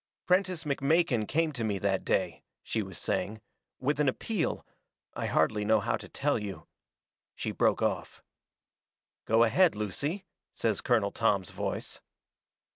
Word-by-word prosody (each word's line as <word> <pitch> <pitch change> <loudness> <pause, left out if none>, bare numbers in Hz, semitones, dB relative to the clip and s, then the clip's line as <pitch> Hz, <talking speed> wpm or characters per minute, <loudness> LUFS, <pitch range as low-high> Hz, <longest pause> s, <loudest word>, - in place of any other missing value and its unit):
"Prentiss 185 -2 +2
McMakin 140 -5 +2
came 160 0 +1
to 125 -6 -4
me 105 -3 0
that 95 -1 0
day," - - 0 0.2
she 110 - -1
was 95 -3 -6
saying, 110 +2 -2 0.4
"with 145 +3 0
an 145 -2 +4
appeal 185 - -2 0.5
I - - -3
hardly 105 +7 +2
know 110 +1 +4
how 110 +3 0
to - - -11
tell 145 -3 0
you." 100 -2 -6 0.7
She - - -3
broke - - +2
off. - - -2 1.0
"Go 115 +1 +5
ahead, 170 - +4
Lucy," 145 - -2 0.3
says 110 -3 0
Colonel 110 -5 +2
Tom's 100 -6 +1
voice. - - -4
115 Hz, 140 wpm, -30 LUFS, 105-155 Hz, 1.0 s, Go